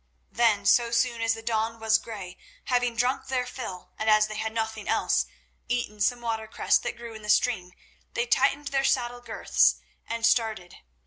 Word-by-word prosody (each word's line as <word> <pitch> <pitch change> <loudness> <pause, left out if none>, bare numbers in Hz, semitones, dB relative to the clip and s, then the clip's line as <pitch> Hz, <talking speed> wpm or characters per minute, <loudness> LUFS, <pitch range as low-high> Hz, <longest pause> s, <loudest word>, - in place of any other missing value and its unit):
Then, 220 -4 +2
so 235 +3 +4
soon 235 0 +1
as 225 0 +2
the 225 - -10
dawn 225 0 -1
was 220 0 +3
grey, 195 -6 -8 0.2
having 245 -2 0
drunk 245 +3 0
their 255 -1 -1
fill 230 -8 -7
and, 220 - 0
as 215 0 +6
they 215 0 -6
had 220 0 -2
nothing 220 -1 -3
else, - - +1 0.4
eaten 240 -4 -2
some 245 +3 +2
watercress 220 -2 0
that - - -5
grew 235 -1 -8
in 220 - -10
the 210 - -8
stream, 210 -4 +2 0.4
they 480 -1 +1
tightened 295 -11 +2
their 270 -1 +1
saddle 245 -2 0
girths 245 - +2 0.3
and 230 0 -1
started. 220 -6 +1
230 Hz, 180 wpm, -27 LUFS, 220-245 Hz, 0.4 s, as